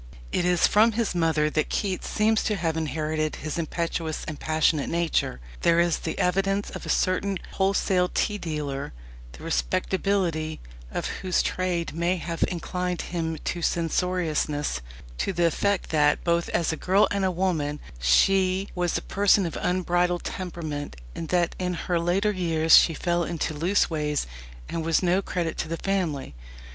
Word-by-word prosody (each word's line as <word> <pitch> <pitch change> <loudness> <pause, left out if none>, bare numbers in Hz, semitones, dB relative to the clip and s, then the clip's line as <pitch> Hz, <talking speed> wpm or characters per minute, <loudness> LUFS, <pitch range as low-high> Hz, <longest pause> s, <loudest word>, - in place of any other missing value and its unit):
It 175 - 0
is 180 -1 +4
from 220 +2 +4
his 225 -2 0
mother 160 -3 +2
that 155 - 0
Keats 190 -3 -2
seems 220 +1 +2
to 210 - +1
have 165 -4 -1
inherited 155 0 -1
his 155 +2 -4
impetuous 165 -1 -2
and 155 - -5
passionate 155 -1 +1
nature. 170 - 0 0.2
There 170 0 +4
is 170 -1 +2
the 160 - -4
evidence 195 +2 +1
of - - -7
a - - -5
certain 195 +1 +1
wholesale 190 -2 +1
tea 210 -1 0
dealer 150 - -4 0.4
the 60 - -12
respectability 160 - 0 0.3
of - - -3 0.2
whose 185 -2 +1
trade 180 -2 -1
may 170 +3 +1
have 165 0 -2
inclined 180 0 -3
him 160 -2 -1
to 175 - -2
censoriousness 165 - 0 0.4
to 195 - 0
the 175 -1 +2
effect 200 +4 0
that, 150 -2 +3
both 170 0 +1
as 165 -1 0
girl 195 +3 +4
and 190 -3 0
woman, 160 -5 0 0.2
she 185 - +3
"was 175 -1 0
a - - -5
person 200 -1 +3
of 165 - -4
unbridled 175 -1 +1
temperament, 160 - -5 0.2
and 165 - -6
that 175 -2 +1
in 180 -1 -1
her 175 0 -1
later 185 +5 +1
years 165 -4 +4
she 165 - +6
fell 175 +1 0
into 165 -2 -2
loose 170 +7 +2
ways, 150 -2 -1 0.4
and 165 - -3
was 165 +2 +2
no 180 +2 +3
credit 175 -4 -3
to - - -1
the 165 +1 -3
family." 170 - -2
170 Hz, 160 wpm, -26 LUFS, 155-185 Hz, 0.4 s, she